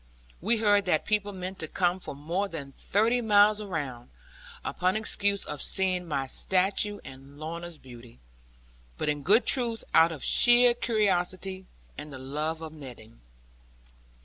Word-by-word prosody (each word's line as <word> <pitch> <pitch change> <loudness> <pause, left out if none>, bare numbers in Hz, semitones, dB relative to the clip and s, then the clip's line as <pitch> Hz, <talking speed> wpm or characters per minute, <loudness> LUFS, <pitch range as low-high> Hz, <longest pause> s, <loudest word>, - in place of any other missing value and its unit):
We 225 +6 +1
heard 205 -2 +3
that 170 -4 +1
people 205 -1 0
meant 185 0 -7
to 155 - -4
come 180 +2 0
from 140 - -8
more 170 +7 -2
than 150 -7 -7
thirty 225 - 0
miles 210 -1 +4
around, 145 - -5 0.6
upon 185 +2 0
excuse 205 -2 -1
of 150 - -5
seeing 185 -2 0
my 140 -4 -2
stature 190 +8 0
and 135 +2 -12
Lorna's 170 +2 -7
beauty; 120 -3 -14 0.8
but - - -1
in 145 -1 -1
good 205 - +3
truth 235 -3 +1
out 165 +1 +6
of 155 -5 -7
sheer 240 0 +6
curiosity, 190 -4 -1 0.3
and 150 - -8
the 135 - -8
love 150 +5 -3
of 160 -1 -8
meddling. 120 - -12
180 Hz, 145 wpm, -27 LUFS, 150-205 Hz, 0.8 s, out